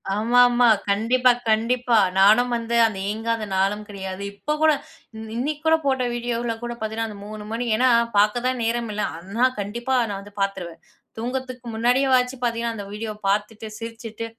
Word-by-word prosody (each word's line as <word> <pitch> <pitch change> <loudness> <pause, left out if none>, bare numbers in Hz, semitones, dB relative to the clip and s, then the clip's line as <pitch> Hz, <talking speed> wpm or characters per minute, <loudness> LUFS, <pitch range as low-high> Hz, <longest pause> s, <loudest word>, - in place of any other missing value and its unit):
ஆமா, 235 +4 +2
ஆமா. 245 0 +4 0.2
கண்டிப்பா, 245 +5 +3 0.2
கண்டிப்பா. 235 +2 +2 0.2
நானும் 220 +5 +5
வந்து 230 0 -2
அந்த 210 - -6
இயங்காத 220 +1 -2
நாளும் 200 +2 0
கிடையாது. 190 -1 -6
இப்போ 300 +9 -3
கூட 315 0 +6 0.6
இன்னைக்கு 290 +5 -2
கூட 320 - +5
போட்ட 265 -2 +1
வீடியோல 235 -1 -2
கூட 240 0 -3
பார்த்தீங்கன்னா 220 +1 -3
அந்த 205 - -9
3 215 0 -8
மணி 235 +2 -2
ஏன்னா 255 +2 +4 0.3
பார்க்க 215 +4 +3
தான் 255 -1 -1
நேரம் 230 0 -1
இல்ல, 210 - -2 0.2
அண்ணா 200 +8 0
கண்டிப்பா 235 +6 -2
நான் 195 - -4
வந்து 205 0 -14
பார்த்துருவேன். 185 -4 -3 0.4
தூங்குறதற்கு 250 0 -5
முன்னாடியே 245 +4 +2
வாச்சு 250 +1 +1
பார்த்தீங்கன்னா 230 -1 -1
அந்த 200 - -6
வீடியோ 215 +1 -4 0.2
பார்த்துட்டு, 210 +2 -1
சிரிச்சுட்டு, 230 0 -7
230 Hz, 165 wpm, -23 LUFS, 210-245 Hz, 0.6 s, கூட